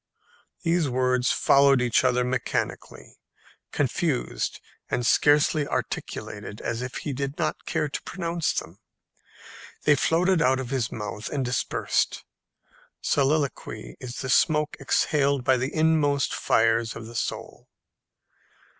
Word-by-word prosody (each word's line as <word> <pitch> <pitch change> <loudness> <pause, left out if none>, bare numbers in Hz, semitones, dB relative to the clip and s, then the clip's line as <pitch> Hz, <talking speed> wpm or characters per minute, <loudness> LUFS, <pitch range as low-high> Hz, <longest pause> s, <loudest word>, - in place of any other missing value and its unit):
These 165 -3 +1
words 125 0 +1
followed 140 -1 +4
each 125 0 +2
other 125 -1 +2
mechanically, 125 -1 -3 0.5
confused, - - -1 0.3
and 125 - -1
scarcely 150 +2 +3
articulated, 105 0 -5
as 120 0 -3
if 125 0 -5
he 145 - -4
did 140 +2 -4
not 155 -2 -2
care - - 0
to 145 - -5
pronounce 170 -3 -2
them. 85 +5 -5 1.0
They 150 - +5
floated 165 +5 +2
out 130 -2 +3
of 130 -1 -5
his 130 -5 -1
mouth 105 0 -5
and 135 -3 -2
dispersed. 125 0 -1 0.7
Soliloquy 140 - -1
is 125 -1 -7
the 130 - -4
smoke 150 0 +2
exhaled 140 0 +1
by 130 0 +3
the 130 +3 -2
inmost 155 -3 +2
fires 115 0 +2
of 115 - -8
the 115 - -10
soul. - - -5
135 Hz, 125 wpm, -25 LUFS, 125-150 Hz, 1.0 s, They